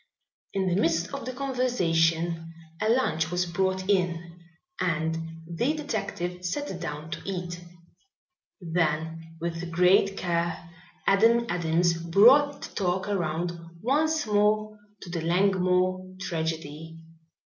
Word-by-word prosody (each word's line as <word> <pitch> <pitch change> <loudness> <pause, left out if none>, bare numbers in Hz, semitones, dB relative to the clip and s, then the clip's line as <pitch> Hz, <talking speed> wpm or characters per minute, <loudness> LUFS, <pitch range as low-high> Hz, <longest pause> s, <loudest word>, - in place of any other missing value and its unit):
In 190 -1 +1
the 180 +2 +2
midst 165 +6 0
of 275 - -5
the 255 - -3
conversation 170 -11 0 0.3
a 215 - +1
lunch 165 -10 +2
was 180 0 0
brought 190 +2 -1
in 175 -3 0 0.4
and 160 -2 0 0.3
the 175 - 0
detective 180 - -4
sat 285 +12 -3
down 150 +2 -5
to - - -4
eat. 175 -2 -4 1.0
Then 165 -1 -2
with 170 +1 -4
great 180 +3 +4
care 170 -1 -2 0.3
Adam 230 +4 +4
Adams 170 0 +2
brought 240 - +5
the - - -8
talk 185 0 -1
around 175 -3 -1 0.3
once 305 - +1
more 215 0 +1 0.2
to 180 - -9
the 170 -1 -2
Langmore 185 +1 +1
tragedy. 160 -3 -4
180 Hz, 115 wpm, -27 LUFS, 165-200 Hz, 1.0 s, brought